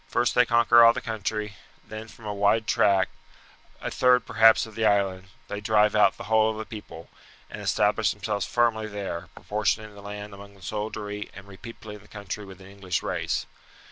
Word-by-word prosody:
First 120 -2 +1
they 125 -1 +4
conquer 120 0 +6
all 115 0 +8
the - - -3
country; 105 -2 -4 0.3
then 110 +1 -8
from 110 0 -15
a 105 - -3
wide 105 +2 +2
tract, 100 -2 +2 0.7
a - - -4
third 125 -2 +3
perhaps 115 -1 +5
of 110 - -12
the 115 - -3
island, 100 -3 +1 0.2
they 105 0 -5
drive 105 0 +3
out 100 -2 +4
the - - -8
whole 110 0 +3
of 110 - -4
the 110 - -5
people, 105 -7 -10 0.4
and - - -7
establish - - +2
themselves 105 -2 -3
firmly 115 -2 +1
there, 100 -5 -5 0.2
portioning 110 0 -1
the 100 - -12
land 105 0 -8
among 100 0 -12
the 95 - -18
soldiery 105 +2 -5
and 95 - -11
repeopling 105 +1 -10
the - - -19
country 105 0 -7
with 95 -1 -12
an 95 - -13
English 95 -2 -4
race. - - -2
105 Hz, 190 wpm, -26 LUFS, 100-110 Hz, 0.7 s, all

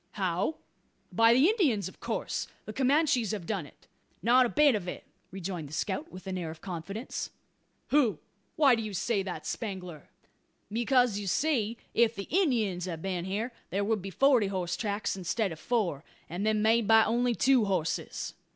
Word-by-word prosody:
"How! 190 - -1 0.6
by 230 0 +5
the 260 +7 +5
Indians, 310 - +2
of - - -12
course? - - -3 0.2
The 215 - -7
Comanches 265 - +2
have 200 -5 -4
done 185 -6 -3
it?" - - -21 0.4
"Not 245 +3 +5
a - - -6
bit 295 0 +5
of 200 -5 -2
it," - - -5 0.3
rejoined 180 -5 -5
the - - -11
scout, 205 - -3
with 185 - -10
an 190 -1 -3
air 165 -2 -4
of 160 0 -9
confidence. 195 - -5 0.6
"Hu! 275 -7 +3 0.4
why 285 -5 +5
do 230 - +1
you 215 -3 -5
say 205 +2 0
that, 190 -2 -6
Spangler?" 185 - -5 0.6
"Because, 240 -1 +2
you 200 - -5
see, 235 - +1 0.2
if 230 -1 +3
the 195 - -6
Indyins 230 - +1
had 175 -3 -4
a - - -13
been 180 -2 -2
here, 215 +6 -3 0.2
there 200 +2 -1
would 215 0 0
be 195 - -6
forty 250 +1 +4
horse 180 -3 -2
tracks 205 -2 -2
instead 195 +2 -1
of 160 - -8
four, 190 - -1 0.2
and 180 +6 -3
them 215 -1 +2
made 225 0 +3
by 225 +1 +7
only 240 +2 +1
two 260 -3 +4
horses." 180 -5 -2
210 Hz, 185 wpm, -29 LUFS, 185-240 Hz, 0.6 s, by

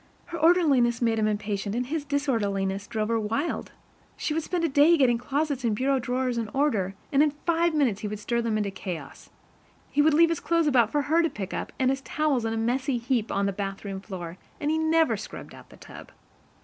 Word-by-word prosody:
Her 340 -1 -6
orderliness 295 -8 +4
made 230 -2 +1
him 215 - +2
impatient, 205 -1 -2
and 250 +1 -1
his 295 +2 -3
disorderliness 200 -9 -1
drove 215 -2 -2
her 230 -1 +1
wild. 225 +9 -2 0.5
She 300 - -2
would 325 - 0
spend 345 +2 -2
a - - +3
day 295 +4 +5
getting 245 -5 +3
closets 280 +1 -2
and 225 -3 +1
bureau 265 +4 +1
drawers 250 0 -1
in 225 - -3
order, 215 -10 +1 0.2
and 280 - +4
in 305 - +5 0.2
five 335 -1 +2
minutes 245 -9 +1
he 210 - -3
would 210 +1 -4
stir 235 +3 -1
them 225 -2 0
into 205 -2 -1
chaos. 180 -7 -7 0.6
He 290 - +3
would 305 0 +4
leave 335 +1 +6
his 335 - -1
clothes 335 -1 +1
about 245 -7 +3
for 295 -1 +1
her 315 +4 +3
to 330 - +1
pick 195 -7 -6
up, - - -4
and 260 0 +2
his 270 0 -2
towels 280 -4 0
in 225 - -1
a - - -2
messy 250 +3 0
heap 235 -2 -1
on 200 - 0
the 200 - -1
bathroom 195 0 -5
floor, 180 -3 -7 0.2
and 295 0 0
he 315 - +1
never 320 -6 +3
scrubbed 215 - -9
out - - -14
the - - -16
tub. - - -12
245 Hz, 225 wpm, -26 LUFS, 210-295 Hz, 0.6 s, leave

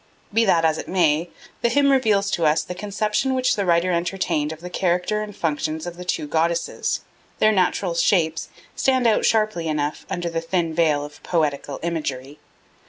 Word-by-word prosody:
Be 225 +1 +3
that 170 -5 +3
as 160 -1 +2
it - - -6
may, 170 -2 +2 0.3
the 235 - +2
hymn 280 +3 +3
reveals 210 -7 +2
to 170 - 0
us 155 +1 +2
the - - -6
conception 210 +7 -1
which 255 -1 +2
the 200 - -1
writer 170 +1 +3
entertained 170 -3 -1
of 160 - -8
the 180 +2 -8
character 180 +4 0
and 210 -2 -7
functions 155 -2 -2
of 175 -1 -6
the 180 - -8
two 180 - -2
goddesses; 165 +2 -1 0.4
their 215 - +4
natural 185 -2 +1
shapes 165 -2 +1 0.3
stand 260 -2 +2
out 220 -2 +3
sharply 215 -7 +1
enough 150 -1 -2
under 175 -1 -3
the 165 0 -2
thin 165 -1 -1
veil 155 -3 +2
of 145 0 -13
poetical 145 -4 -1
imagery. 145 -4 -4
170 Hz, 180 wpm, -22 LUFS, 160-205 Hz, 0.4 s, their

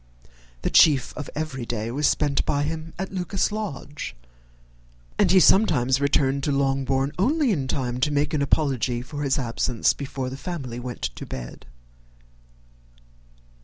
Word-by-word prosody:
The - - 0
chief 140 -6 +5
of 145 - -6
every 150 -4 -3
day 115 -1 -3
was 145 +4 +1
spent 145 -2 +1
by 145 0 0
him 160 +2 -4
at 190 +1 -4
Lucas 185 +2 -1
Lodge, 150 - -5 1.0
and - - +4
he 190 - +6
sometimes 145 - +4
returned 140 -1 +2
to 145 - +1
Longbourn 135 0 +1
only 280 - +2
in 140 -9 -1
time 125 -2 -2
to 135 - +2
make 145 +2 0
an 150 - +1
apology 130 -4 +1
for 145 +3 -7
his 140 -2 +1
absence 120 -2 +1
before 135 -2 -5
the 135 - -6
family 135 -8 -5
went 125 0 -7
to - - -4
bed. - - -8
140 Hz, 150 wpm, -24 LUFS, 130-155 Hz, 1.0 s, he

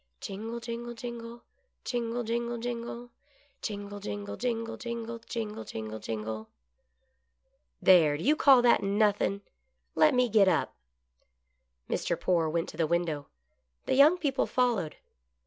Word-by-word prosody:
Jingle, 225 +4 -5
jingle, 235 0 -6
jingle. 235 0 -7 0.4
Jingle, 240 -1 -2
jingle, 235 +1 -2
jingle; 240 0 -5 0.5
Jingle, 205 -1 -5
jingle, 205 0 -5
jingle, 230 -2 -2
jifigle, 235 -1 -5
Jmgle, 220 -2 -4
jingle, 110 0 -6
jingle! 110 0 -5 0.7
" - - -47
There, 160 -6 +6
do 160 - -6
you 295 +5 +4
call 270 -5 +6
that 240 - +5
nothin'? 200 0 +1 0.5
Let 305 -3 +4
me 250 0 +4
get 210 -3 +5
up." 180 -3 +1 1.1
Mr. - - -1
Poore 170 -3 +2
went 165 +1 -1
to - - -10
the 165 - +1
window. 165 -3 -1 0.6
The - - 0
young 295 +6 +6
people 285 -6 0
followed. 240 -11 0
225 Hz, 130 wpm, -29 LUFS, 170-240 Hz, 1.1 s, There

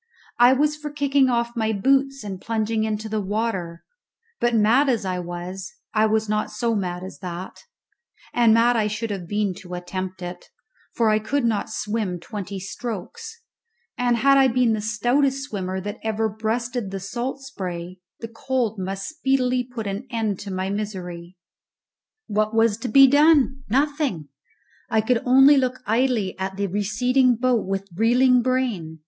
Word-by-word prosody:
I 245 +2 +7
was 295 +3 +2
for 300 0 -6
kicking 280 -2 +2
off 235 0 0
my 220 -1 0
boots 270 +5 +1
and 195 -3 -6
plunging 220 0 -1
into 215 0 -3
the 215 -1 -2
water, 190 -5 -3 0.6
but, 240 0 +1
mad 230 +6 +4
as 230 -6 0
I 185 -1 -2
was, 180 +4 -6 0.2
I 215 0 +3
was 220 0 +1
not 215 0 -1
so 230 +2 -1
mad 180 -4 -3
as 190 - -9
that; 180 -1 -7 0.7
and 235 -2 +4
mad 230 +2 +4
I 215 -2 +2
should 210 +1 -3
have 185 -4 -5
been 205 0 0
to 180 -2 -8
attempt 185 +1 -5
it, 175 0 -8 0.5
for 230 -2 +3
I 215 0 +3
could 240 +5 -1
not 220 -3 0
swim 210 -4 -3
twenty 200 +1 -6
strokes, 345 - -7 0.5
and 245 -1 +1
had 275 +3 +5
I 265 - +6
been 245 -2 +2
the 215 - -2
stoutest 255 +6 +1
swimmer 190 -7 -4
that 205 +3 -6
ever 220 0 0
breasted 225 +1 -3
the 195 0 -5
salt 240 +8 -4
spray, 180 -8 -6 0.2
the 230 - -4
cold 230 -2 -2
must 195 +1 -4
speedily 265 -4 0
put 245 -3 -7
an 200 +6 -4
end 220 -5 -2
to 200 - -7
my 185 +1 -2
misery. 185 -4 -5 0.9
What 215 +1 -1
was 225 -2 +3
to 235 - -5
be 275 +1 +7
done? 285 -1 +4
Nothing! 275 - 0 0.6
I 220 -2 +2
could 230 +2 +1
only 270 +3 +7
look 255 -1 0
idly 225 -3 +1
at 190 0 -4
the 200 - 0
receding 240 +6 +2
boat 245 -3 +1
with 195 0 -3
reeling 245 +4 +4
brain. 230 -11 -1
220 Hz, 165 wpm, -23 LUFS, 195-255 Hz, 0.9 s, I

